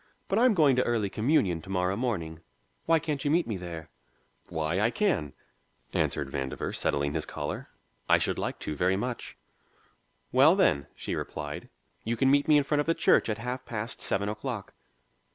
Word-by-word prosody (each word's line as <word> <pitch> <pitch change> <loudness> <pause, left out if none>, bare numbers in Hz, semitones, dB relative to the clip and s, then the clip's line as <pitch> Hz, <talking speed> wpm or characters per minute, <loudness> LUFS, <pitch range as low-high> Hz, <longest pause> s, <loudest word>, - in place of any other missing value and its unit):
But 200 - +1
I'm 245 -2 +5
going 150 -6 +5
to 125 - +4
early 110 -5 0
communion 105 - +2
to 95 - -13
morrow 90 0 0
morning; 90 -10 -2 0.5
why 165 0 +5
can't 150 -3 -2
you 145 - +1
meet 170 +3 +3
me 110 - -3
there?" 85 -3 -7 0.6
"Why, 80 +1 -1
I 105 +3 +3
can," 120 - 0 0.6
answered 65 -2 0
Vandover, 65 -1 -3
settling 70 0 0
his - - -2
collar. - - -5 0.4
"I - - +7
should - - 0
like - - -2
to 75 - -3
very 90 +5 +2
much." 120 +3 -4 0.9
"Well, 140 +7 +6
then," 70 - +2
she - - -4
replied, 75 -1 -5 0.3
"you 115 +1 -1
can 135 +3 +4
meet 145 +2 +3
me 150 -1 +6
in 145 - +3
front 145 +1 0
of 145 - -5
the 165 - +2
church - - +4
at 105 - -1
half 125 +3 -4
past 110 0 -5
seven 100 +1 0
o'clock." 105 0 -4
110 Hz, 185 wpm, -28 LUFS, 85-145 Hz, 0.9 s, I